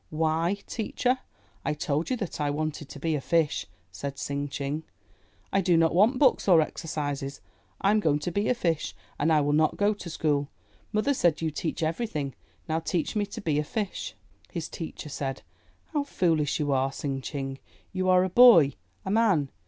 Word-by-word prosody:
'Why, 160 +4 +1
teacher, 250 +3 -1 0.4
I 150 - -1
told 150 +1 -1
you 255 - 0
that 200 -8 -4
I 145 - +1
wanted 150 0 -3
to - - -9
be 160 +2 0
a 150 - -1
fish," 165 0 +1 0.2
said 140 +8 -5
Tsing 140 +1 -2
Ching. 140 +2 -3 0.7
"I 195 - +4
do 175 -2 +3
not 165 0 +3
want 215 +9 +4
books 260 -5 +3
or 175 -4 +7
exercises. 145 -3 -3 0.4
I 200 - +4
am 215 - +4
going 155 -7 +2
to 150 +4 -3
be 200 +4 0
a 250 - +3
fish 165 -8 -1 0.2
and 155 +3 +2
I 155 -1 +5
will 145 0 +1
not 155 +1 +3
go 205 +1 +3
to 195 -4 -8
school. 145 -3 0 0.4
Mother 215 +7 +2
said 170 - +2
you 160 - 0
teach 160 +2 -3
everything; 160 - -2 0.3
now 160 0 0
teach 165 +4 -2
me 205 -1 0
to 200 - -7
be 155 -6 +1
a - - +1
fish." 205 +5 -4 0.4
His 170 -4 -4
teacher 160 -2 -7
said, 135 -1 -4 0.5
How 295 -2 +1
foolish 165 - +1
you 145 -2 0
are, 135 0 +2
Tsing 135 -1 -3
Ching; 135 -1 -5 0.3
you 185 0 0
are 185 0 +6
a 185 - 0
boy, 185 - +8 0.3
a 190 - -2
man. 200 -11 +3
160 Hz, 190 wpm, -27 LUFS, 145-195 Hz, 0.7 s, boy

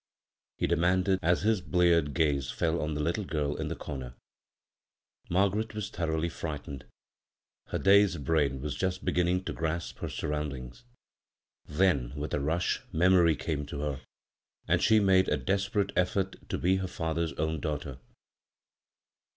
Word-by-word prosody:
he - - 0
demanded, 90 +3 +2
as 85 +3 +2
his 110 -2 +2
bleared 85 -5 +2
gaze 70 -6 +1
fell 85 0 0
on 75 0 -2
the 75 - -1
little 85 +7 -1
girl 75 -5 -2
in - - -3
the - - -3
comer. 65 -4 -7 1.1
Margaret 100 +4 +1
was 105 -2 -4
thoroughly 80 -1 -1
frightened. 75 -5 -6 0.8
Her - - -2
dazed 100 -5 +4
brain 70 -4 +1
was 75 - -2
just 95 0 -2
beginning 90 +1 +1
to - - -4
grasp 80 +1 -3
her - - -4
surroundings. 75 - -4 0.8
Then 75 -6 +1
with 75 +1 -4
a - - +1
rush 80 +5 0
memory 85 -1 +4
came 75 0 -3
to 70 0 -5
her, 70 -2 -3 0.7
and - - +2
she 110 -1 +5
made 95 -2 +4
a 75 - +2
desperate 100 +7 0
effort 95 +1 0
to - - -1
be 95 +3 +2
her 95 0 -2
father's 80 -1 -2
own 80 0 -2
daughter. 70 -3 -4
85 Hz, 150 wpm, -29 LUFS, 75-95 Hz, 1.1 s, she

